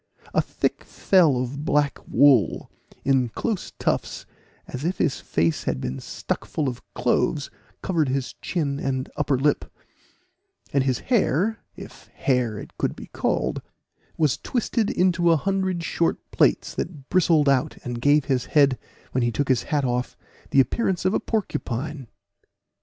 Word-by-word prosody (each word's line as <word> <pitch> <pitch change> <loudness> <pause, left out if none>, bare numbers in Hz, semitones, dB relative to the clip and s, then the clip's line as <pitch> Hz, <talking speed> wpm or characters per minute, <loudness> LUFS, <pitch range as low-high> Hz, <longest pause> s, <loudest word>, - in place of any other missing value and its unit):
A - - +4
thick - - -2
fell 170 -9 +3
of 130 +3 -4
black 145 -2 +1
wool, 130 - +4 0.3
in 130 -3 +3
close 210 - -3
tufts, - - -2 0.4
as 130 - -6
if 175 +4 -1
his 145 - 0
face 80 0 0
had 65 - -1
been 65 +1 -4
stuck - - -4
full 150 - -2
of 125 -1 -4
cloves, 125 +4 0 0.3
covered 160 -7 +1
his 130 0 -2
chin 140 -6 -1
and 130 -2 -2
upper 145 -2 +1
lip; 145 +3 0 1.0
and 140 -1 +3
his 130 -2 +1 0.2
hair, 215 - +2 0.2
if - - -12
hair 125 -6 0
it - - -10
could - - 0
be - - -11
called, - - -1 0.6
was 155 -4 +2
twisted 230 -3 -1
into 175 -1 +2
a 165 - +5
hundred 190 0 -1
short 170 0 0
plaits, - - +2
that 150 -6 -6
bristled 165 -5 +3
out, 135 -2 +2
and 120 -1 -4
gave 145 +1 +4
his 130 -3 0
head, 140 -4 +3 0.3
when 130 - 0
he 120 0 +1
took 140 +4 -1
his 130 -3 +3
hat 145 -3 +1
off, 125 0 -2 0.3
the 135 - +3
appearance 185 - +1
of 185 - +3
a - - +2
porcupine. 145 - -3
140 Hz, 155 wpm, -24 LUFS, 125-170 Hz, 1.0 s, a